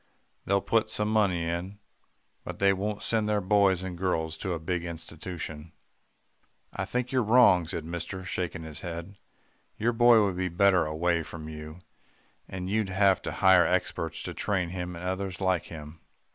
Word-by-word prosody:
They'll 100 0 +2
put 110 -1 +1
some 105 -1 -1
money 95 -6 +2
in 85 +4 -3 0.7
but - - -7
they 100 0 +4
won't 105 +2 -3
send 110 -2 +1
their 105 -1 +2
boys 95 -2 +3
and 95 -2 -5
girls 85 -3 -1
to 95 - -2
a 85 - -3
big 90 +2 -2
institution.' 80 -1 -7 1.0
"'I - - -3
think 125 0 -2
you're 130 -1 +2
wrong,' 110 -7 +5
said 80 -1 -4
mister 85 +3 -5
shaking 90 -3 -3
his 80 -2 -8
head. 85 +3 -7 0.6
'Your 120 +2 +1
boy 115 -2 +6
would 95 -3 -2
be 90 0 -1
better 90 -2 +3
away 85 +2 0
from 80 0 -8
you 75 +2 -9 0.7
and 90 -1 -5
you'd 105 0 0
have 95 0 +3
to - - -4
hire 95 -2 +5
experts 80 -3 -1
to - - -5
train 95 -4 -1
him 90 0 -5
and 85 +2 -7
others 95 0 -3
like 95 -3 +1
him. 80 0 -10
90 Hz, 175 wpm, -28 LUFS, 85-100 Hz, 1.0 s, boy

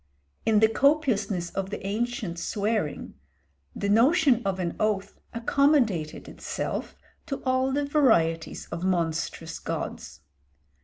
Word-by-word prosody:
In 215 -1 +4
the 220 - +7
copiousness 225 - +1
of 195 0 -3
the 205 - -6
ancient 215 -3 -2
swearing 205 -3 -2 0.6
the 200 - -2
notion 245 - +4
of 195 -2 -1
an 175 -2 -2
oath 210 -2 -1
accommodated 230 - +1
itself - - -4 0.3
to 280 - -2
all 260 +1 +2
the 285 +1 0
varieties 170 - +2
of 170 +1 -4
monstrous 170 -2 -1
gods. - - -5
215 Hz, 115 wpm, -26 LUFS, 180-260 Hz, 0.6 s, the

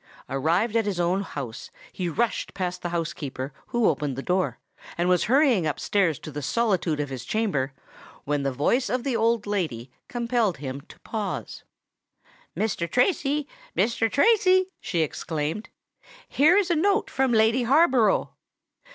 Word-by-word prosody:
Arrived 170 - 0
at 225 -2 +2
his 190 -4 -2
own 175 +3 +1
house, 135 - -6 0.2
he 180 -2 -2
rushed 230 +7 -1
past 180 -1 -3
the 175 - -3
housekeeper 145 -5 -4
who 240 -2 +2
opened 145 -3 0
the 135 - -5
door, 185 +1 0 0.4
and 175 +1 +1
was 180 -1 +3
hurrying 250 - +3
up 150 - -2
stairs 185 -8 +1
to 155 - -9
the 145 +1 -5
solitude 185 - 0
of 145 -1 -2
his 130 -2 -6
chamber, 150 - -1 0.5
when 145 0 -1
the 135 0 0
voice 190 - +1
of 250 -1 -1
the 265 -3 -1
old 230 -1 +1
lady 155 - -3 0.2
compelled 235 - 0
him 135 0 -6
to - - -17
pause. 215 -3 -5 0.9
"Mr. 195 -6 -1
Tracy—Mr. 290 - 0
Tracy," 375 - +4
she 170 -3 -1
exclaimed; 155 +5 -3 0.6
"here 315 +7 +4
is 385 -3 +2
a - - +3
note 400 +6 +1
from 265 -1 +1
Lady 225 +2 +4
Harborough." 255 - +3
200 Hz, 150 wpm, -25 LUFS, 155-245 Hz, 0.9 s, Tracy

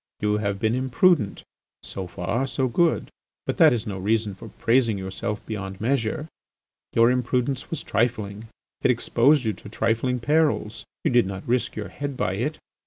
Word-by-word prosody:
You 105 0 +1
have 100 -2 -1
been 110 +2 +1
imprudent. 130 - +2 0.4
So 95 -2 -6
far 100 +10 -2
so 130 0 0
good, 165 +7 +1 0.3
but - - -2
that - - +7
is 120 -1 -1
no 100 -3 -4
reason 105 +1 0
for 105 +4 -10
praising 115 -1 +2
yourself 95 +2 -4
beyond 95 -3 -5
measure. 135 +5 0 0.7
Your 115 +1 +5
imprudence 125 +1 0
was 165 - -4
trifling; 110 -1 -1 0.3
it - - +3
exposed 145 -1 +3
you 110 - +1
to 100 - -12
trifling 115 +3 0
perils; 145 -5 +1 0.2
you - - +2
did 120 -5 +4
not 95 0 -6
risk 125 +1 0
your 105 - -5
head 140 -2 -5
by 95 - 0
it. 125 +10 -2
115 Hz, 170 wpm, -25 LUFS, 105-130 Hz, 0.7 s, that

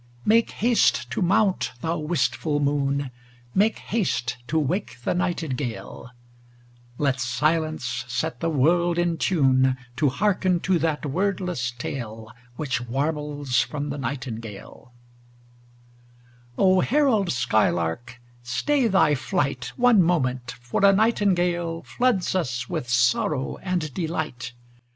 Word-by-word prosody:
Make 225 +2 +4
haste 225 - +2
to - - -2
mount, 190 +2 +2
thou 165 +1 -1
wistful 150 -1 0
moon, 140 -1 0 0.4
Make 210 +3 +2
haste 125 - -1
to 160 - 0
wake 160 +2 -1
the - - 0
nightingale: 150 -10 -3 0.9
Let 140 -2 0
silence 150 +1 -1
set 125 0 -3
the 165 - 0
world 170 +4 +2
in 175 -1 +1
tune 130 -6 +3 0.2
To 150 - +3
hearken 185 +3 +1
to 185 -2 +1
that 155 -1 -1
wordless 180 -4 -1
tale 115 -3 -6 0.2
Which 130 -3 -2
warbles 145 0 -1
from 145 +2 -4
the 145 - -5
nightingale 115 -2 -6 1.7
O 185 -1 +4
herald 230 - +2
skylark, 120 -1 0 0.2
stay 250 - +1
thy 190 -7 +4
flight 140 -3 -1
One 245 -5 +5
moment, 130 -8 0
for 125 +10 -2
a 200 - +8
nightingale 180 -6 +1
Floods 245 -7 0
us 130 -9 -2
with 125 - -4
sorrow 125 +3 +1
and 175 -6 -3
delight. 160 -8 -4
150 Hz, 115 wpm, -24 LUFS, 125-180 Hz, 1.7 s, a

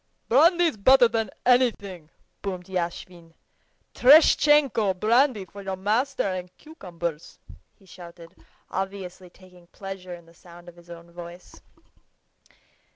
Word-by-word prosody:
"Brandy's 330 +3 +3
better 255 +4 +5
than 225 -2 -3 0.2
anything," 205 -10 0 0.3
boomed 185 -3 -6
Yashvin. 170 -2 -6 0.6
"Tereshtchenko! 275 - +4
brandy 230 -1 +1
for 200 +3 -12
your 195 -1 -5
master 220 +9 -1
and 185 -2 -4
cucumbers," 170 - -8 0.4
he 195 - -25
shouted, 170 -1 -14 0.4
obviously 190 -1 -6
taking 180 -1 -20
pleasure 190 -1 -9
in 170 -1 -17
the 165 - -21
sound 175 +1 -17
of 175 - -13
his 175 0 -20
own 170 0 -13
voice. 175 +1 -12
190 Hz, 115 wpm, -24 LUFS, 175-230 Hz, 0.6 s, better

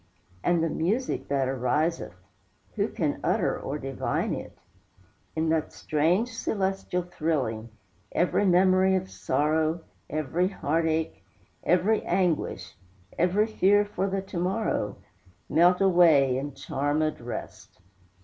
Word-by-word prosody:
And 175 -2 +2
the 165 - +1
music 215 +11 -1
that 135 -2 0
ariseth, 135 - -1 0.6
Who - - +1
can - - -2
utter - - +1
or 140 - -4
divine 135 -2 -2
it? - - -7 0.8
In 160 0 0
that 160 -1 0
strange 175 +11 0
celestial 195 -4 -2
thrilling, 145 -10 -2 0.4
Every 180 +3 +1
memory 185 0 +4
of 190 0 -3
sorrow, 155 +4 0 0.3
Every 155 +4 0
heart 165 -4 -1
ache, 160 0 -2 0.4
every 190 +5 +2
anguish, 170 - -1 0.4
Every 185 +5 +3
fear 205 -1 +3
for 195 -1 -2
the 195 0 -2
to 190 -2 -5
morrow, 180 - -1 0.5
Melt 180 +3 +4
away 165 -9 +5
in 140 +2 -3
charmèd 145 +1 -1
rest. 120 -2 -8
165 Hz, 120 wpm, -27 LUFS, 145-190 Hz, 0.8 s, away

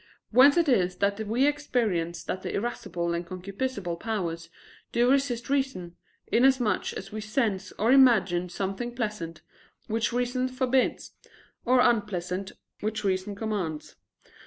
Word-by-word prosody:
Whence 265 +6 +7
it 340 -2 +3
is 185 -9 +2
that 200 +2 0
we 240 +6 +2
experience 220 - 0
that 185 - -4
the - - -4
irascible 175 -6 -2
and 170 0 -2
concupiscible 185 +1 -4
powers 170 -7 -3 0.4
do 240 +2 +3
resist 265 -4 +1
reason, 265 -11 -1 0.3
inasmuch 250 -2 +2
as - - -7
we 215 0 -5
sense 210 -3 -1
or 225 +4 +1
imagine 195 -10 +5
something 195 +7 -4
pleasant, 210 -9 -4 0.4
which 225 +1 -1
reason 245 +1 0
forbids, 255 0 0 0.5
or 250 0 +5
unpleasant, 195 -5 0 0.3
which 215 +1 -3
reason 190 +1 -1
commands. 195 -8 -4
215 Hz, 130 wpm, -27 LUFS, 185-250 Hz, 0.5 s, Whence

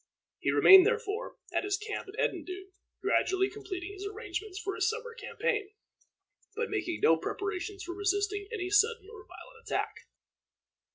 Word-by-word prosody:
He - - 0
remained, 385 0 +9
therefore, 455 0 -2 0.2
at - - +1
his 400 0 0
camp 420 -1 -5
at 390 - -11
Edendune, 380 +1 -2 0.3
gradually 380 +1 +2
completing 385 -2 -6
his 395 0 -8
arrangements 410 -2 -5
for 390 +2 -3
his - - +1
summer 465 +1 -5
campaign, 425 -3 -2 0.8
but 465 0 -2
making 355 -5 -2
no 165 - +6
preparations 390 - -4
for 350 0 -5
resisting 405 +1 0
any 380 -5 -3
sudden 430 0 +3
or 415 -3 -12
violent 465 -2 -14
attack. - - 0
405 Hz, 150 wpm, -30 LUFS, 380-430 Hz, 0.8 s, remained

